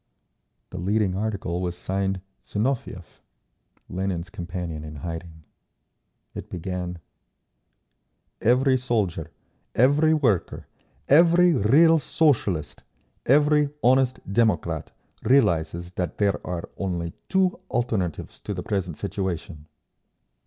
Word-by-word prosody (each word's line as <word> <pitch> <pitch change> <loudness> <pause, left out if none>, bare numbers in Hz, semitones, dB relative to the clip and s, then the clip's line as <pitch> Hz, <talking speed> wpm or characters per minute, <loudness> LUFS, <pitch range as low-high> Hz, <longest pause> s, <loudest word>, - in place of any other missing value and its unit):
The - - -6
leading 100 +1 +1
article 95 -4 -2
was 90 -1 -3
signed 95 +1 -2 0.3
"Zinoviev,"—Lenin's 95 - -5
companion 85 -3 -5
in 75 0 -8
hiding. 80 +1 -7 0.9
It - - -8
began: 90 0 -4 1.4
Every 130 +3 +4
soldier, 105 -10 -1 0.5
every 145 +6 +4
worker, 120 - 0 0.4
every 170 +3 +6
real 155 +8 +5
Socialist, 120 - 0 0.5
every 150 +2 +4
honest 130 +1 +3
democrat 105 -4 +1 0.3
realises 85 - +2
that 90 -3 -3
there 100 -2 +1
are 90 -2 -4
only 85 -3 -3 0.2
two 190 -1 +2
alternatives 110 -9 -2
to 105 - -4
the 90 - -4
present 95 -6 -2
situation. 95 -5 -4
95 Hz, 95 wpm, -25 LUFS, 85-130 Hz, 1.4 s, every